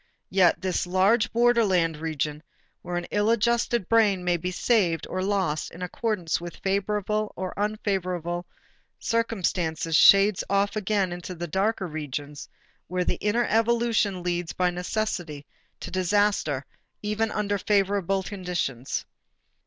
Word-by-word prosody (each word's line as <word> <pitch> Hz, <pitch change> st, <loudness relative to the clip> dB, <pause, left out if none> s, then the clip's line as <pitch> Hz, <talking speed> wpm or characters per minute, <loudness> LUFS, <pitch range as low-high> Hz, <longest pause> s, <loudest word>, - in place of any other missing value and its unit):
Yet 185 Hz, -2 st, +4 dB
this 185 Hz, -1 st, -1 dB
large 195 Hz, +5 st, +3 dB
borderland 220 Hz, -9 st, +3 dB
region, 150 Hz, -1 st, -3 dB, 0.4 s
where 175 Hz, 0 st, -4 dB
an 175 Hz, -, -3 dB
ill 205 Hz, +1 st, +2 dB
adjusted 235 Hz, -2 st, +1 dB
brain 210 Hz, -5 st, +3 dB
may 175 Hz, -1 st, +2 dB
be 175 Hz, +2 st, -3 dB
saved 185 Hz, -4 st, +1 dB
or 185 Hz, -, -3 dB
lost 185 Hz, -6 st, 0 dB
in 180 Hz, -, -9 dB
accordance 180 Hz, -4 st, -2 dB
with 175 Hz, 0 st, -7 dB
favorable 210 Hz, +2 st, -1 dB
or 185 Hz, -1 st, -4 dB
unfavorable 185 Hz, -5 st, -2 dB, 0.5 s
circumstances, 180 Hz, -8 st, -1 dB
shades 195 Hz, +4 st, +6 dB
off 200 Hz, +1 st, +1 dB
again 195 Hz, -4 st, -1 dB
to 180 Hz, -, -7 dB
the 175 Hz, +1 st, -4 dB
darker 190 Hz, +4 st, 0 dB
regions 150 Hz, -2 st, -6 dB, 0.4 s
where 180 Hz, 0 st, -1 dB
the -, -, -1 dB
inner 230 Hz, +3 st, +1 dB
evolution 225 Hz, -4 st, +1 dB
leads 175 Hz, -1 st, -2 dB
by 180 Hz, -1 st, +1 dB
necessity 175 Hz, -5 st, -3 dB, 0.4 s
to -, -, -6 dB
disaster 185 Hz, -7 st, +1 dB, 0.4 s
even 210 Hz, +2 st, 0 dB
under 205 Hz, -1 st, -1 dB
favorable 195 Hz, -1 st, +1 dB
conditions. 180 Hz, -, -3 dB
190 Hz, 130 wpm, -26 LUFS, 175-210 Hz, 0.5 s, shades